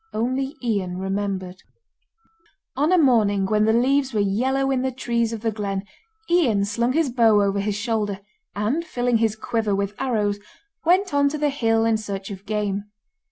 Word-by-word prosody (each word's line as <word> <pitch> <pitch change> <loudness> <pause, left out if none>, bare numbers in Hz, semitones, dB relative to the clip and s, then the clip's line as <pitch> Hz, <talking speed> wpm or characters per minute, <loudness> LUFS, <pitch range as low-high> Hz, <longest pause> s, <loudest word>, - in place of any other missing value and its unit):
Only 260 +5 -1
Ian 195 -6 -1
remembered. 190 -1 -3 1.1
On 295 +6 +1
a 370 - +5
morning 215 - +3
when 210 +2 +2
the 220 - +3
leaves 260 +2 +2
were - - +2
yellow 260 +7 +1
in 260 -1 +1
the 260 0 -1
trees 235 -2 -1
of 225 -2 -5
the 225 -1 0
glen, 200 -2 -3 0.4
Ian 255 - +2
slung 235 +5 0
his 310 -3 +1
bow 225 -4 +4
over 200 0 0
his 200 0 -1
shoulder, 210 -2 -2 0.4
and 220 +11 0
filling 245 -6 0
his 220 -1 +1
quiver 220 -2 -1
with 200 +1 -2
arrows, 210 -6 0 0.4
went 365 +2 +2
on 285 0 +3
to 305 - -4
the 295 0 +1
hill 225 -5 +1
in 225 -1 +2
search 200 -2 -6
of 195 +1 -9
game. 205 -1 -2
225 Hz, 175 wpm, -23 LUFS, 205-260 Hz, 1.1 s, a